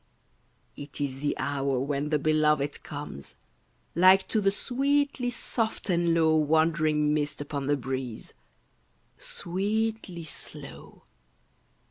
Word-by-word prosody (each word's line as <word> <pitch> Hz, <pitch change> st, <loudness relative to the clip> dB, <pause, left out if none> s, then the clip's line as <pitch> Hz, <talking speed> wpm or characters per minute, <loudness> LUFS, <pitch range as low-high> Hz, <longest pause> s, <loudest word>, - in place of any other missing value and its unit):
It 145 Hz, 0 st, -9 dB
is 135 Hz, -2 st, -2 dB
the 145 Hz, +1 st, -1 dB
hour 140 Hz, -2 st, -1 dB
when 140 Hz, +2 st, -1 dB
the 150 Hz, -, +2 dB
belovèd 150 Hz, -1 st, +1 dB
comes, 140 Hz, -, -8 dB, 0.6 s
Like 185 Hz, +3 st, +6 dB
to 220 Hz, -, +1 dB
the 195 Hz, -, +4 dB
sweetly 275 Hz, +4 st, +1 dB
soft 225 Hz, -3 st, -2 dB
and 170 Hz, -1 st, +2 dB
low 160 Hz, -1 st, +4 dB
Wandering 155 Hz, -1 st, +2 dB
mist 150 Hz, -1 st, -1 dB
upon 145 Hz, -2 st, -4 dB
the 145 Hz, 0 st, +2 dB
breeze, 130 Hz, -3 st, -5 dB, 0.9 s
Sweetly 200 Hz, 0 st, -2 dB
slow. 155 Hz, -, -9 dB
155 Hz, 110 wpm, -28 LUFS, 145-190 Hz, 0.9 s, Like